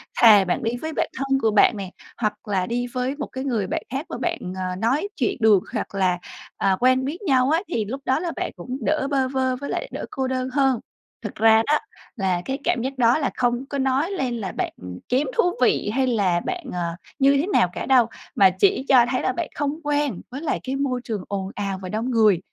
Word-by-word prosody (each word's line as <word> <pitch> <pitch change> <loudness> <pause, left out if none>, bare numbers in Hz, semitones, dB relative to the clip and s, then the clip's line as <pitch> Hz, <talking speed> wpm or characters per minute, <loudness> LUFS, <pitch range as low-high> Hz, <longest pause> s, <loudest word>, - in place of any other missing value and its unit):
Thà 210 -4 +7
bạn 180 - -1
đi 225 - 0
với 315 +4 -5
bạn - - -1
thân 270 0 +1
của 225 - +2
bạn 215 +1 +4
nè, 190 -2 -6 0.3
hoặc 215 0 -3
là 190 -3 0
đi 245 +1 -1
với 255 +2 -1
một 290 - -5
cái 260 0 -6
người 230 -8 -1
bạn - - -2
khác 270 +6 -3
mà - - -4
bạn, 340 -1 -2 0.2
ờ, 185 -1 -3
nói 240 - 0
chuyện 395 - 0
được 215 -5 +5
hoặc - - -3
là, 185 -2 +1 0.4
à, 195 -1 +2
quen 255 +1 +3
biết 315 +8 -4
nhau 265 -7 +3
á 325 +3 +2
thì 220 - 0
lúc 265 +7 -5
đó 260 - +2
là 340 0 -3
bạn - - -3
cũng 250 +9 -6
đỡ 305 -3 +1
bơ 270 -2 +2
vơ 260 -1 0
với 280 +2 -6
lại - - -3
đỡ - - -5
cô 265 -1 -2
đơn 255 0 -2
hơn. 270 -4 +2 0.4
Thực - - -6
ra 225 0 +5
đó 300 - +4 0.4
là 190 -5 0
cái 265 - -2
cảm 235 - +1
giác 265 +2 -4
đó 240 -1 +4
là 290 - 0
không 245 +1 0
có 280 - -3
nói 270 +6 +1
lên 265 -10 -2
là 195 -4 -4
bạn - - -3 0.4
kém 260 +4 +2
thú - - +5 0.2
vị 235 - +2
hay 265 0 +1
là 200 -8 +2
bạn, 360 - -4
ờ, 170 -1 -2 0.2
như 275 0 +5
thế 305 - 0
nào 180 - +4
cả - - -4
đâu, 255 -4 +5 0.3
mà 195 -1 +7
chỉ 200 +7 +3
cho 250 -3 +7
thấy 255 - 0
là - - +1
bạn 325 +3 -3
không 290 +1 -2
quen 290 -7 0
với 270 - -6
lại 320 - -1
cái 265 +1 -3
môi 270 -3 -1
trường 215 -6 -4
ồn 195 -1 -3
ào 195 -2 -3
và 185 - -6
đông 225 +6 -2
người. 215 -6 +4
255 Hz, 240 wpm, -23 LUFS, 210-275 Hz, 0.4 s, Thà